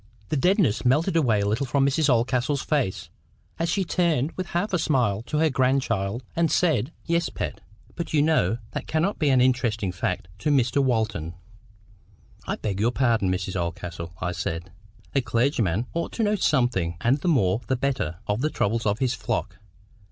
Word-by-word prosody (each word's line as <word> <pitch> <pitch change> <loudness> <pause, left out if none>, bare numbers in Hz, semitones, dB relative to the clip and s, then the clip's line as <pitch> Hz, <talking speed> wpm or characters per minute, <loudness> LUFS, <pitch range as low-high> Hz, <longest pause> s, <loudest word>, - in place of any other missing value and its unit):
The - - 0
deadness 180 - +2
melted 155 +8 +2
a 165 - +5
little 110 +1 +1
from 135 +2 +2
Mrs 145 +2 +2
Oldcastle's 125 +3 +1
face, 140 - -1 0.5
as 165 +1 0
she 195 +3 +1
turned 165 -5 +1
with 185 -1 -5
half 185 +4 -2
a 180 - +2
smile 120 -10 +1
to 150 - -1
her 160 0 +3
grandchild, 125 -4 0
and 165 -2 +2
said— 160 -5 +2
"Yes, 170 0 +1
Pet. - - -5 0.3
But 170 - -4
you 150 -2 +3
know 120 - +2
that - - -5
cannot 170 +6 0
be 150 -3 +2
an 130 -2 +4
interesting 115 -6 +1
fact 85 - -3
to 150 - -1
Mr. 135 -1 +3
Walton." 110 -10 -1 1.1
"I - - -1
beg 100 -3 -3
your 110 +3 +3
pardon, 115 -6 +1
Mrs. 95 0 -2
Oldcastle," 85 -1 -4
I 90 - -2
said. 85 0 -4 0.4
"A 135 - +3
clergyman 115 - +1
ought 170 - -2
to 230 - -1
know 210 0 +2
something, 120 - +1
and 120 - +2
the 160 - -3
more 110 - +2
the 130 - +1
better, 125 - -1
of 105 +3 -1
the 155 - +1
troubles 115 -4 0
of 100 0 +1
his 130 0 0
flock. 105 -6 -3
125 Hz, 180 wpm, -25 LUFS, 105-150 Hz, 1.1 s, a